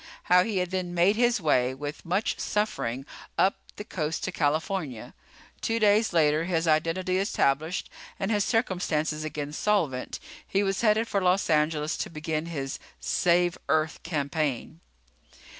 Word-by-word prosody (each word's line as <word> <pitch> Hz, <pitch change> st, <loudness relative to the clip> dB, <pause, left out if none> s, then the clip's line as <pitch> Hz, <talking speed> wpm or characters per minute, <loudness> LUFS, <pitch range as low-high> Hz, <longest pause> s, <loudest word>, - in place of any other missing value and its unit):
How 180 Hz, 0 st, +5 dB
he 210 Hz, -1 st, -2 dB
had 180 Hz, 0 st, -1 dB
then 180 Hz, -2 st, -2 dB
made 180 Hz, +4 st, +4 dB
his 240 Hz, 0 st, +3 dB
way, 130 Hz, -6 st, +2 dB
with 145 Hz, +4 st, -7 dB
much 190 Hz, +5 st, 0 dB
suffering, 135 Hz, -, -1 dB, 0.3 s
up 195 Hz, -, +3 dB, 0.2 s
the 210 Hz, -, -6 dB
coast 160 Hz, -7 st, -3 dB
to 185 Hz, -, -2 dB
California. 155 Hz, -, -2 dB, 0.5 s
Two 225 Hz, -, 0 dB
days 215 Hz, 0 st, +4 dB
later, 155 Hz, -1 st, +3 dB
his 170 Hz, -2 st, 0 dB
identity 165 Hz, +4 st, +1 dB
established 160 Hz, -4 st, 0 dB, 0.3 s
and 195 Hz, +3 st, -1 dB
his 205 Hz, -2 st, +2 dB
circumstances 170 Hz, -9 st, 0 dB
again 150 Hz, -1 st, -4 dB
solvent, 160 Hz, -10 st, 0 dB, 0.3 s
he 195 Hz, +1 st, +1 dB
was 195 Hz, -1 st, 0 dB
headed 220 Hz, 0 st, +3 dB
for 200 Hz, -, 0 dB
Los 185 Hz, 0 st, +2 dB
Angeles 155 Hz, 0 st, +1 dB
to -, -, -3 dB
begin 155 Hz, 0 st, -3 dB
his 140 Hz, -5 st, -4 dB, 0.2 s
save 175 Hz, 0 st, +2 dB
Earth 155 Hz, 0 st, +1 dB
campaign. 150 Hz, -2 st, -2 dB
170 Hz, 145 wpm, -27 LUFS, 155-195 Hz, 0.5 s, How